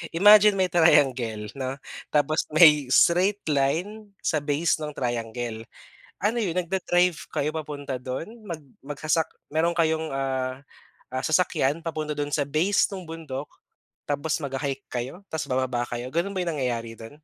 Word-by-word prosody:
imagine 210 Hz, +2 st, +7 dB
may 185 Hz, -2 st, +1 dB
triangle 125 Hz, -10 st, +3 dB
'no, 130 Hz, -1 st, -4 dB, 0.3 s
tapos 150 Hz, +1 st, +1 dB
may 150 Hz, -4 st, +7 dB
straight 185 Hz, +9 st, +3 dB
line 195 Hz, +9 st, -1 dB
sa 155 Hz, -, +1 dB
base 150 Hz, +3 st, 0 dB
ng 150 Hz, -1 st, -5 dB
triangle. 115 Hz, -2 st, -3 dB, 0.6 s
Ano 220 Hz, +4 st, +1 dB
yun, 195 Hz, -8 st, -1 dB
nagda-drive 180 Hz, -1 st, +1 dB
kayo 150 Hz, -, 0 dB
papunta 145 Hz, -4 st, -5 dB
do'n, 130 Hz, -, -6 dB
mag 165 Hz, -5 st, -6 dB, 0.2 s
magsasak 155 Hz, +2 st, 0 dB, 0.2 s
meron 165 Hz, +3 st, +1 dB
kayong 160 Hz, -3 st, 0 dB
ah 130 Hz, -1 st, -2 dB, 0.5 s
ah, 130 Hz, +1 st, -3 dB
sasakyan 155 Hz, -2 st, +1 dB
papunta 155 Hz, -2 st, -3 dB
do'n 145 Hz, 0 st, -3 dB
sa 145 Hz, -1 st, 0 dB
base 165 Hz, +8 st, +2 dB
nung 190 Hz, -, -6 dB
bundok, 160 Hz, -5 st, -7 dB, 0.6 s
tapos 150 Hz, +2 st, -1 dB
magha-hike 135 Hz, 0 st, -3 dB
kayo, 125 Hz, +10 st, -5 dB
tapos 160 Hz, -, -3 dB
bababa 130 Hz, -1 st, 0 dB
kayo, 120 Hz, +1 st, -5 dB
gano'n 185 Hz, +5 st, -1 dB
ba 185 Hz, -, 0 dB
yung 170 Hz, -, -1 dB
nangyayari 120 Hz, -5 st, -2 dB
do'n? 115 Hz, 0 st, -9 dB
150 Hz, 145 wpm, -25 LUFS, 130-170 Hz, 0.6 s, imagine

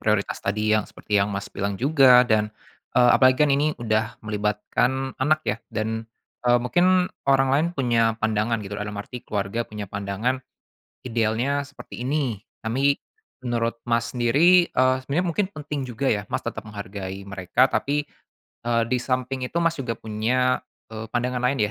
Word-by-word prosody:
prioritas 105 Hz, -2 st, 0 dB
tadi 105 Hz, +2 st, 0 dB
yang 110 Hz, -, +2 dB
seperti 105 Hz, -1 st, -1 dB
yang 100 Hz, -, +1 dB
Mas 100 Hz, 0 st, -4 dB
bilang 100 Hz, 0 st, -2 dB
juga 130 Hz, -1 st, +6 dB
dan, 110 Hz, -3 st, +2 dB, 0.5 s
eee, 125 Hz, -1 st, +6 dB
apalagi 130 Hz, -1 st, +5 dB
kan 145 Hz, -, +1 dB
ini 150 Hz, +2 st, +1 dB
udah 110 Hz, 0 st, -1 dB
melibatkan 110 Hz, +5 st, -1 dB
anak 155 Hz, +3 st, +3 dB
ya 105 Hz, -, 0 dB
dan, 110 Hz, 0 st, -3 dB, 0.4 s
eee, 120 Hz, 0 st, +5 dB
mungkin 180 Hz, +8 st, +3 dB, 0.2 s
orang 135 Hz, -1 st, +4 dB
lain 150 Hz, +4 st, +3 dB
punya 115 Hz, -4 st, +2 dB
pandangan 110 Hz, +1 st, 0 dB
gitu 100 Hz, +1 st, -6 dB
dalam 105 Hz, 0 st, -5 dB
arti 115 Hz, +4 st, -7 dB
keluarga 105 Hz, +3 st, -2 dB
punya 105 Hz, -1 st, -6 dB
pandangan, 100 Hz, +6 st, -2 dB, 0.6 s
idealnya 120 Hz, +4 st, 0 dB
seperti 140 Hz, -3 st, -10 dB
ini 135 Hz, -7 st, -1 dB, 0.3 s
tapi, 135 Hz, +5 st, +2 dB, 0.5 s
menurut 115 Hz, -1 st, -1 dB
Mas 115 Hz, -1 st, 0 dB
sendiri, 155 Hz, +9 st, +4 dB
eee, 130 Hz, 0 st, +4 dB
sebenarnya 165 Hz, +6 st, 0 dB
mungkin 190 Hz, +4 st, +1 dB
penting 145 Hz, -3 st, -4 dB
juga 125 Hz, +2 st, -2 dB
ya 105 Hz, -2 st, 0 dB
Mas -, -, -1 dB
tetap -, -, -5 dB
menghargai 100 Hz, -2 st, -6 dB
mereka 100 Hz, +7 st, +2 dB
tapi, 145 Hz, +1 st, -1 dB, 0.5 s
eee, 115 Hz, -1 st, +1 dB
di 125 Hz, +2 st, 0 dB
samping 130 Hz, 0 st, -2 dB
itu -, -, -3 dB
Mas 170 Hz, -1 st, +2 dB
juga 115 Hz, -4 st, -3 dB
punya, 120 Hz, +4 st, 0 dB, 0.3 s
eee, 110 Hz, 0 st, -6 dB
pandangan 125 Hz, +1 st, -1 dB
lain 125 Hz, +2 st, +1 dB
120 Hz, 160 wpm, -24 LUFS, 110-135 Hz, 0.6 s, juga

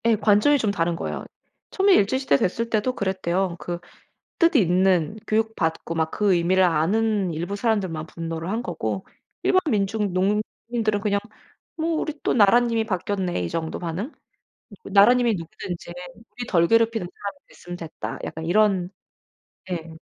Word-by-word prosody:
예. 230 Hz, -1 st, +5 dB
관점이 215 Hz, +7 st, +4 dB
좀 220 Hz, -6 st, 0 dB
다른 170 Hz, -3 st, 0 dB
거예요. -, -, -4 dB, 0.5 s
처음에 390 Hz, 0 st, +4 dB
일제시대 260 Hz, -, +3 dB
됐을 230 Hz, +9 st, -1 dB
때도 230 Hz, +3 st, 0 dB
그랬대요. 190 Hz, -2 st, -1 dB
그 175 Hz, 0 st, -4 dB, 0.6 s
뜻 335 Hz, -1 st, +4 dB
있는 185 Hz, -, +3 dB
교육 220 Hz, +1 st, +1 dB
받고 165 Hz, -1 st, -2 dB
막 160 Hz, -1 st, 0 dB
그 205 Hz, -2 st, +2 dB
의미를 180 Hz, +2 st, +3 dB
아는 190 Hz, +3 st, +1 dB
일부 175 Hz, +6 st, -3 dB
사람들만 195 Hz, -8 st, -1 dB
분노를 165 Hz, 0 st, -5 dB
한 225 Hz, +4 st, -2 dB
거고 110 Hz, -, -3 dB, 0.4 s
일반 370 Hz, -, +4 dB
민중 205 Hz, -2 st, 0 dB
농민들은 210 Hz, +3 st, -1 dB
그냥 200 Hz, 0 st, +1 dB, 0.6 s
'뭐 325 Hz, +1 st, 0 dB
우리 310 Hz, -1 st, -3 dB
또 -, -, +1 dB
나라님이 230 Hz, +1 st, +4 dB
바뀌었네.' 185 Hz, -, -2 dB
이 85 Hz, -, -3 dB
정도 160 Hz, -1 st, -3 dB
반응? 180 Hz, -, -4 dB, 0.7 s
'나라님이 230 Hz, +4 st, +5 dB
누구든지 175 Hz, 0 st, -7 dB, 0.2 s
우리 240 Hz, +3 st, -9 dB
덜 170 Hz, -2 st, +3 dB
괴롭히는 230 Hz, -3 st, +2 dB
사람이 200 Hz, -1 st, -7 dB
됐으면 175 Hz, 0 st, -9 dB
됐다.' 165 Hz, -2 st, -6 dB
약간 160 Hz, 0 st, -6 dB
이런 190 Hz, 0 st, +2 dB, 0.8 s
예. 165 Hz, -2 st, -5 dB
200 Hz, 320 characters per minute, -24 LUFS, 170-225 Hz, 0.8 s, 예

